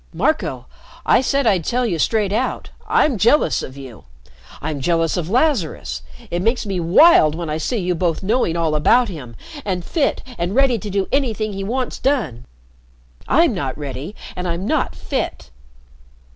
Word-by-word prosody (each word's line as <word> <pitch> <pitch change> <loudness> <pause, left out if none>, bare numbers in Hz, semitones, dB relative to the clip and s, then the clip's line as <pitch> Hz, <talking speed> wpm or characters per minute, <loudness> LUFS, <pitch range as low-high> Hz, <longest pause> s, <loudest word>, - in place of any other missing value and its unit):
Marco - - 0 0.4
I - - +5
said 275 +1 +1
I'd 195 -6 +3
tell 245 +8 0
you 175 -8 -1
straight 210 +2 +1
out 250 +5 -2 0.2
I'm 310 - +2
jealous 235 +10 +3
of 130 - -8
you. 125 - -11 0.5
I'm 150 -1 -4
jealous 165 +2 +1
of 175 -2 -3
Lazarus. 210 - 0 0.3
It 175 - -1
makes 230 +4 +1
me 195 -3 -2
wild 170 - +6
when 165 -2 -4
I 155 - -2
see 235 +9 -1
you 180 -3 0
both 170 0 -1
knowing 195 -5 +1
all 165 -2 0
about 225 +11 +3
him, 130 -10 -8 0.3
and 180 -4 -3
fit 310 -5 0 0.2
and 175 +4 -1
ready 265 -3 +3
to 210 - -6
do 195 0 -1
anything 225 -6 0
he 195 0 -4
wants 250 +5 -3
done. 230 - -1 0.8
I'm 330 -1 +4
not 135 -9 -3
ready 145 +6 -6 0.2
and 180 0 -4
I'm 170 +2 -3
not - - 0
fit." - - -4
190 Hz, 170 wpm, -20 LUFS, 160-245 Hz, 0.8 s, wild